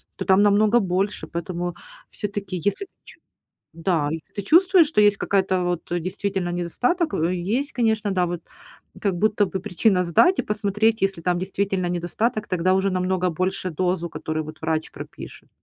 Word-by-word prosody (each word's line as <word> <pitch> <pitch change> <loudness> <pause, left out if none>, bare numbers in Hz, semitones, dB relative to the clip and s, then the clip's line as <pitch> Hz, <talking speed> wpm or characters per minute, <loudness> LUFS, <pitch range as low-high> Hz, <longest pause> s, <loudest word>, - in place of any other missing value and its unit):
то - - -4
там 190 0 +5
намного 210 +3 +4
больше. 195 0 -1
Поэтому 175 0 -4 0.3
всё-таки 200 -2 -5
если 205 - -1
ты - - -27 0.2
ч - - -15 0.6
Да, 165 -3 0
если 160 0 -7
ты 200 - -3
чувствуешь, 350 - +5
что 250 -9 +2
есть 205 -1 +4
какая-то, 190 -2 +1
вот 175 -1 -1
действительно 185 +1 -2
недостаток, 250 - -1
э, 165 +3 0 0.3
есть, 285 +1 -4
конечно, 220 -3 0
да. 185 -2 +1
Вот 175 -1 -4 0.6
как 200 -3 0
будто 210 +2 +2
бы 190 - -4
причина 185 0 +1
сдать 270 - +4
и - - +1
посмотреть, 210 +1 0
если 195 -3 0
там 175 0 +1
действительно 190 -1 -1
недостаток, 210 +6 -1
тогда 185 +1 +1
уже 190 +1 +1
намного 185 -1 0
больше 185 +2 -2
дозу, 180 +1 -1
которую 155 -1 -4
вот 155 - -10
врач 160 0 -1
пропишет. - - -10
190 Hz, 170 wpm, -23 LUFS, 175-210 Hz, 0.6 s, там